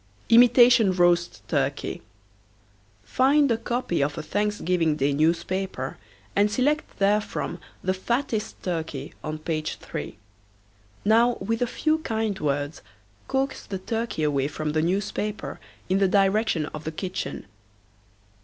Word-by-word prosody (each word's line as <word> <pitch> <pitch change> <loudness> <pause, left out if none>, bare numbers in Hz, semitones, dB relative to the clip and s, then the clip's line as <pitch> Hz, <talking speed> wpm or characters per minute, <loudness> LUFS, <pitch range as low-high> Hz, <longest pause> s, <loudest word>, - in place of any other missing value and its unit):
IMITATION 240 -3 +7
ROAST 175 -1 +2
TURKEY. 140 -2 -1 1.0
Find 275 - +3
a 230 - +2
copy 235 - -1
of 145 +1 -1
a - - -4
Thanksgiving 180 -4 0
Day 140 0 +1
newspaper 165 - -1 0.4
and 205 +1 +4
select 285 +8 +1
therefrom 200 -3 0 0.2
the 185 - +1
fattest 230 +3 -2
turkey 160 -5 -4
on 155 0 -3
page 155 0 -3
3. - - -7 0.9
Now 230 +3 +4
with 225 +4 -2
a 245 - +2
few 310 +6 0
kind 220 -7 -2
words 145 0 -2 0.5
coax 270 0 -1
the 195 - -3
turkey 225 -3 -3
away 140 -2 +1
from 155 0 -3
the 155 +1 +1
newspaper 200 +4 -2 0.3
in 190 - +2
the 195 - +4
direction 195 -3 +2
of 155 - -6
the 160 - -3
kitchen. 185 - -5
190 Hz, 125 wpm, -25 LUFS, 155-225 Hz, 1.0 s, IMITATION